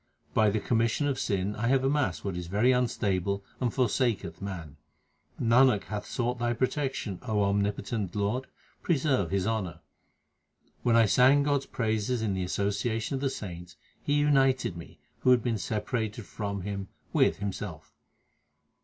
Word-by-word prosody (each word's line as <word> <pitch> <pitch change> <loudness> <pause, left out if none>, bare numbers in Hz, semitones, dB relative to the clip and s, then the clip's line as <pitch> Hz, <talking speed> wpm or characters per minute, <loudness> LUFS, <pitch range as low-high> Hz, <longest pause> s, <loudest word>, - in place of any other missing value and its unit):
By 110 -1 +4
the 105 +1 0
commission 115 +6 +1
of 140 -2 0
sin 100 +1 -1
I 115 +3 -1
have 130 +1 +3
amassed 135 -10 0
what 95 -3 -2
is 90 -1 -5
very 105 +8 +3
unstable 100 -6 0 0.2
and 125 -3 0
forsaketh 125 -2 0
man. 85 -7 -6 0.6
Nanak 120 -2 +4
hath 105 -1 -5
sought 120 0 -2
Thy 120 0 +1
protection, 130 - -2
O 105 -2 0
omnipotent 100 0 -1
Lord; 105 +6 -1 0.3
preserve 135 - +1
his 95 0 0
honour. 95 -7 -2 1.0
When 120 -2 +3
I 115 -1 +6
sang 130 +8 +5
God 145 -1 +2
s - - -11
praises 110 +1 -1
in 105 -3 0
the 95 - -2
association 100 +6 -1
of 135 - -2
the 140 - +1
saints, 85 - -7 0.3
He 145 - -1
united 135 -8 +3
me, 85 -1 -10 0.2
who 130 - +2
had 125 -3 +5
been 115 -3 0
separated 105 +3 -2
from 100 +5 -4
Him, 100 0 -4 0.3
with - - +3
Himself. 100 -1 -6
110 Hz, 155 wpm, -28 LUFS, 100-125 Hz, 1.0 s, I